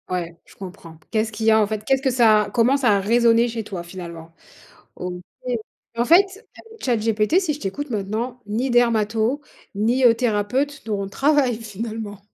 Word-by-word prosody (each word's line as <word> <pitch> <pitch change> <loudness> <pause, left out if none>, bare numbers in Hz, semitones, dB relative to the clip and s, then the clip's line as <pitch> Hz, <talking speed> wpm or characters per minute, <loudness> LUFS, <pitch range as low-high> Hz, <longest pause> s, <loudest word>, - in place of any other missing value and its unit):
Ouais, 175 -2 -3
je - - -19
comprends. 180 -4 -10
Qu'est-ce 220 0 0
qu'il 220 +1 -4
y 225 - +6
a, 220 0 +5
en 210 - +2
fait, 215 0 -4
qu'est-ce 270 -1 +2
que 270 - +1
ça 225 -4 +4
a 205 - -6
comment 235 +5 +3
ça 260 -4 +2
a 200 -1 +4
résonné 230 +3 +3
chez 230 -1 -4
toi, 190 -4 -6
finalement, 170 -2 -9 0.6
OK, 180 0 -6 0.7
en 235 - +1
fait, 330 +7 +7 0.4
avec 450 0 -15
ChatGPT, 225 - +2
si 330 -6 -1
je 290 - -11
t'écoute 265 +9 -4
maintenant, 225 +4 -3
ni 230 +6 -1
dermato, 230 +1 +2 0.4
ni, 235 +5 +1
heu, 235 -2 +7
thérapeutes 250 +5 -1
n'auront 205 -3 -2
de - - -10
travail, 275 0 +2
finalement? 220 -1 -6
225 Hz, 185 wpm, -22 LUFS, 205-245 Hz, 0.7 s, fait